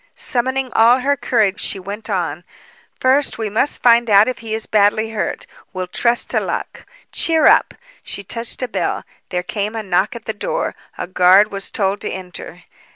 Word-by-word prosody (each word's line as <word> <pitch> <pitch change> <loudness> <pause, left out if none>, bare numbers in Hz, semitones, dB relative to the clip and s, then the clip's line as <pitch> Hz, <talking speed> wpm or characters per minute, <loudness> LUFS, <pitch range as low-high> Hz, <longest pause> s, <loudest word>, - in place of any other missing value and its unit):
Summoning 260 +1 -1
all 240 +3 +5
her 285 +2 +2
courage, 225 -6 +1
she - - -1
went 205 +4 -7
on: 175 -3 -2 0.6
"First, 270 +3 +2
we 220 -2 -3
must 245 +7 0
find 235 -1 +5
out 205 +1 +6
if 255 - -3
he 225 -1 -4
is 220 - -2
badly 215 +1 +2
hurt. 225 - -3 0.3
We'll 185 -1 -3
trust 235 +6 +1
to - - +2
luck. - - -5 0.2
Cheer 320 -2 +2
up!" - - +4 0.3
She 200 - -7
touched 230 +5 -4
a - - -1
bell. 235 - -2 0.3
There 180 -1 -2
came 210 +3 -3
a 220 - -3
knock 195 +4 0
at 235 - -9
the 220 - -3
door. - - -3 0.2
A - - -3
guard 185 +3 +4
was 195 -1 -4
told 200 0 -1
to - - -2
enter. 180 -2 -8
220 Hz, 185 wpm, -18 LUFS, 195-245 Hz, 0.6 s, out